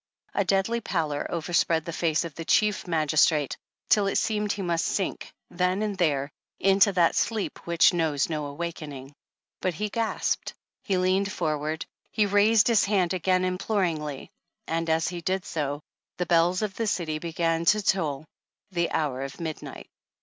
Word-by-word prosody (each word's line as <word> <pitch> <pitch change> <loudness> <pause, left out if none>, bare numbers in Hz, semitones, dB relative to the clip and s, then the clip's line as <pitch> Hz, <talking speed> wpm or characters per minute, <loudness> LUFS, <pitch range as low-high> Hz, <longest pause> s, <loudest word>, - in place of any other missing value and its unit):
A - - +2
deadly 200 +5 +1
pallor 155 -8 -2
overspread 165 -1 +1
the 170 - -5
face 160 0 +1
of 165 - -7
the 165 - -6
Chief 210 +3 +2
Magistrate 155 -2 +2 0.3
till 205 -2 +4
it 195 - +1
seemed 210 -2 0
he 200 - -3
must 170 -2 0
sink 195 - -2 0.2
then 180 +3 0
and 210 -2 -2
there 145 -6 0 0.3
into 195 +1 +5
that 175 -2 +3
sleep 220 -3 -1
which 170 +1 +5
knows 160 -5 +1
no 150 -3 -3
awakening, 145 -3 -6 0.5
but 185 -3 -1
he 210 +5 -2
gasped, 225 +2 -1 0.3
he 195 -3 0
leaned 190 +2 +1
forward, 155 -2 -2 0.2
he 215 - +2
raised 205 +2 +4
his 230 -3 +4
hand 195 -3 +1
again 185 0 +1
imploringly, 180 -7 -2 0.3
and 165 0 -2
as 160 +1 +2
he 175 -1 -6
did 185 +2 -1
so, 145 -1 -3 0.3
the 180 - -1
bells 175 +3 +3
of 210 -2 -2
the 225 - -1
city 160 -6 -1
began 165 0 -1
to 215 +5 +5
toll 155 -7 0 0.5
the 170 -2 0
hour 140 -5 -1
of 135 0 -6
midnight. 160 -2 -6
170 Hz, 165 wpm, -26 LUFS, 155-195 Hz, 0.5 s, into